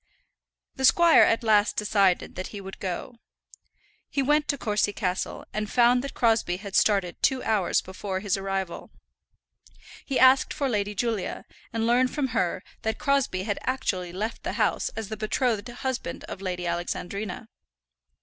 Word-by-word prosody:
The 265 - +2
squire 340 +4 +6
at 230 +1 +3
last 210 -2 +3
decided 200 -3 +2
that 185 - -5
he 205 - -8
would 195 0 -9
go. 195 +6 -5 0.9
He 275 0 0
went 295 +2 +2
to 285 - 0
Courcy 210 -3 0
Castle, 185 -3 -3
and 215 0 -2
found 245 +2 +4
that 275 - -6
Crosbie 225 -6 +2
had 200 0 -7
started 195 -4 +2
two 265 -2 +2
hours 210 -5 +1
before 190 0 -5
his 195 -1 0
arrival. 195 -2 -4 1.1
He 270 - -2
asked 260 +1 +5
for 285 -3 0
Lady 210 -4 -1
Julia, 225 -2 -2 0.3
and 225 -2 -1
learned 245 +2 +3
from 275 0 -2
her 185 -5 -1 0.2
that 220 0 -2
Crosbie 275 -10 +1
had 205 -1 -2
actually 185 -9 -2
left 215 +5 -4
the - - -3
house - - +1
as 225 -2 -5
the 220 - -5
betrothed 215 0 -1
husband 255 +1 -4
of 190 - -8
Lady 180 -2 -3
Alexandrina. 180 +4 -4
215 Hz, 160 wpm, -26 LUFS, 190-250 Hz, 1.1 s, squire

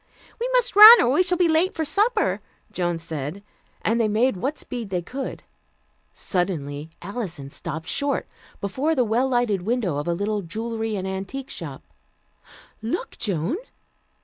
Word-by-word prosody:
"We 485 +2 -1
must - - +2
run, 435 +3 +12
or - - +3
we 295 - +4
shall 360 -1 +1
be 355 -1 +4
late 330 +3 +2
for 320 - -1
supper," 435 +7 +1 0.3
Joan 175 -2 -1
said, 160 +3 -6 0.4
and 230 +2 +1
they 225 - +3
made 220 +3 +2
what 270 +11 -3
speed 235 -5 -6
they 180 -2 -2
could. 265 +8 -6 0.7
Suddenly 150 - -3
Alison 175 - -6
stopped 160 +3 -6
short 280 0 -1 0.3
before 265 +11 0
the 255 - +3
well 240 +5 +1
lighted 240 -6 +1
window 210 - -1
of 145 - -3
a 170 - +1
little 205 +3 -1
jewelry 220 +4 -4
and 190 -1 -3
antique 195 +8 -5
shop. 145 -6 -7 1.0
"Look, 235 +11 -3
Joan!" 195 - -1
220 Hz, 155 wpm, -24 LUFS, 175-275 Hz, 1.0 s, run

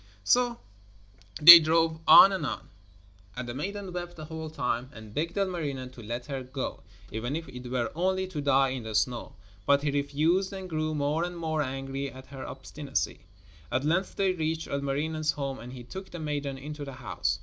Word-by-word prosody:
So 245 - +3 0.8
they 170 +2 +13
drove 160 0 +2
on 195 - +10
and 190 - -2
on, - - -4 0.7
and 125 -1 -5
the 120 - -4
maiden 195 +6 -5
wept 175 -1 -5
the 155 - -8
whole 160 0 -6
time, 125 -4 -2
and 110 -4 -12
begged 165 - -2
Ilmarinen 150 -10 -2
to 125 - -12
let 120 +3 -5
her 135 -1 -4
go, 130 +1 -5 0.3
even 120 +6 -3
if 165 0 -5
it 125 0 -9
were 125 -2 -1
only 185 +3 0
to 155 -6 -4
die 135 -1 +3
in 130 -1 -4
the 110 -1 -6
snow, 120 +3 -1 0.3
but 140 0 +4
he 145 - +1
refused 155 +7 +1
and 190 -1 -6
grew 155 -2 -2
more 150 +3 0
and 175 0 -4
more 160 -2 -1
angry 135 0 -3
at 130 0 -12
her 135 -1 -7
obstinacy. 135 -7 -4 0.4
At 130 +2 0
length 170 +5 0
they 195 -2 +2
reached 160 -1 -2
Ilmarinen's 150 +3 -1
home 135 -2 -4
and 120 +3 -9
he 125 -1 -9
took 190 +10 -8
the 175 - -8
maiden 145 -3 -3
into 150 +2 -7
the 140 -1 -7
house. 105 -5 -2
145 Hz, 195 wpm, -28 LUFS, 130-165 Hz, 0.8 s, they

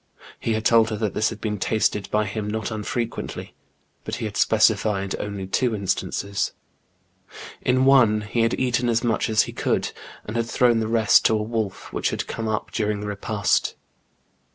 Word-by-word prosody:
He 115 - -1
had 110 0 -2
told 115 -1 +5
her 110 - -2
that 105 -1 -2
this 110 - +1
had - - -8
been 105 -2 -3
tasted 105 -1 0
by 105 0 +1
him 105 +1 -4
not 110 +2 -3
unfrequently, 115 +2 -4 0.5
but - - -4
he - - -4
had - - -5
specified 100 -3 +2
only 100 -2 -4
two 115 +4 0
instances: 100 0 -2 1.1
in 130 +1 +2
one 120 -6 +5
he 105 +3 -3
had 115 +1 +1
eaten 125 -1 +1
as 115 +1 +1
much 115 -2 0
as 110 -1 +4
he - - -7
could, - - -1 0.3
and 105 - -6
had 115 -1 0
thrown 120 -1 +3
the 110 - -1
rest 110 -2 +4
to 110 - +4
a 105 - -2
wolf, 110 -3 -4
which - - 0
had - - -3
come 115 - -4
up 110 -1 -2
during 105 -1 -1
the - - -5
repast. 105 0 0
110 Hz, 185 wpm, -23 LUFS, 105-115 Hz, 1.1 s, told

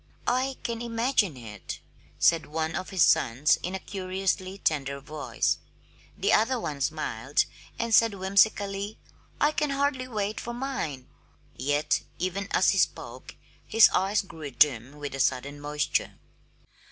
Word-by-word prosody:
"I 260 +2 0
can 235 -1 -3
imagine 230 - +1
it," 105 -4 -8 0.4
said 165 -3 +3
one 160 +1 -2
of 185 - -4
his 185 -4 +3
sons 140 +6 +4
in 180 +2 -3
a - - -3
curiously 190 0 -2
tender 140 -6 -1
voice. 145 +1 -1 0.6
The 405 - +2
other 245 +3 +3
one 145 -9 -4
smiled, 140 -3 0 0.3
and 230 -1 -1
said 225 -2 +5
whimsically, 200 +1 +1 0.4
"I 295 - +4
can 300 -1 0
hardly 275 -2 0
wait 210 -3 -2
for 240 0 -5
mine!" 240 - -4 0.5
Yet 145 +4 +1 0.2
even 185 +3 -2
as - - +4
he - - +1
spoke - - -2 0.3
his 225 0 +7
eyes 195 +3 +1
grew 160 -5 -8
dim 135 -1 +2
with 145 -1 -5
a 135 - -5
sudden 140 +3 0
moisture. 150 0 -1
185 Hz, 140 wpm, -27 LUFS, 145-225 Hz, 0.6 s, his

